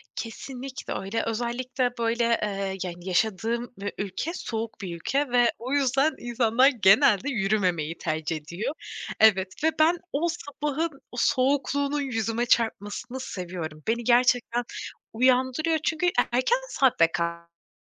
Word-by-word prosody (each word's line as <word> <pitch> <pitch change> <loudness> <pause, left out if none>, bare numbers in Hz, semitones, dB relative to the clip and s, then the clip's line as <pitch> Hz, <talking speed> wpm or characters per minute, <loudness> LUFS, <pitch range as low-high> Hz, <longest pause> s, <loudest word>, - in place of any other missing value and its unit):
Kesinlikle 255 +3 -6
öyle. 195 +4 -2
Özellikle 245 +2 -1
böyle, 235 +1 +1 0.2
eee, 195 -2 -2
yani, 175 0 -7
yaşadığım 225 +5 0
ü 205 - -3
ülke 200 - -3
soğuk 225 - -5
bir 175 -3 -5
ülke 270 - -1
ve 245 -1 +4
o 255 +4 -4
yüzden 275 +2 +2
insanlar 240 +1 +3
genelde 210 0 +4
yürümemeyi 190 - 0
tercih 160 0 -2
ediyor. 170 - -4 0.5
Evet 190 +1 +3
ve 320 - +5
ben 330 +3 +5 0.2
o 310 +5 +1
sabahın 300 -2 -3
o 245 - -10
soğukluğunun 280 +1 +1
yüzüme 230 -2 -1
çarpmasını 230 +2 0
seviyorum. 175 -9 -6
Beni 235 +2 0
gerçekten 245 0 +3 0.5
uyandırıyor 260 +6 +2
çünkü 330 +1 0
e - - +5 0.2
erken 260 - +2
saatte 255 - +4
kalkmam 170 0 -4
235 Hz, 130 wpm, -26 LUFS, 195-265 Hz, 0.5 s, ve